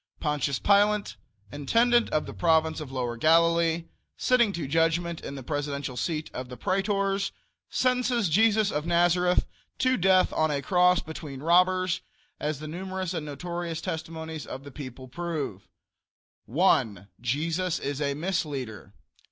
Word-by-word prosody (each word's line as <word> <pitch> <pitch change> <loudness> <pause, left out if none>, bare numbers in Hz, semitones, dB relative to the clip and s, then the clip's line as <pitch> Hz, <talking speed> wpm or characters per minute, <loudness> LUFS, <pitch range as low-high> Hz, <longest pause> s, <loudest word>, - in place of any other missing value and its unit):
Pontius 150 -3 0
Pilate, 205 +1 +3 0.4
intendent 230 - +2
of 155 - 0
the - - -7
Province 160 -1 +2
of 150 -4 -7
Lower 125 -3 -3
Galilee, 165 +3 +3 0.3
sitting 240 -4 +3
to 165 -6 -3
judgment 165 +2 +1
in 140 - -6
the 135 - -7
presidential 140 -1 -3
seat 155 +3 -3
of 125 0 -6
the 125 - -8
Praetors, 195 0 0 0.4
sentences 250 -3 +1
Jesus 215 +4 +3
of 150 +2 -2
Nazareth 175 +1 +3 0.3
to 255 0 +2
death 185 0 +4
on 155 0 +2
a 140 -2 -1
cross 180 -1 +4
between 150 -4 -8
robbers, 185 +2 +3 0.4
as 150 0 -2
the 155 - -7
numerous 185 +2 -4
and 160 -3 -4
notorious 170 +2 -4
testimonies 160 -1 -5
of 135 - -7
the 140 - -10
people 130 -2 -9
prove: 145 - -4 0.8
1. 115 - +2
Jesus 160 +8 -1
is 140 +1 -4
a 140 -1 0
misleader. 140 - -3
165 Hz, 140 wpm, -27 LUFS, 145-185 Hz, 0.8 s, death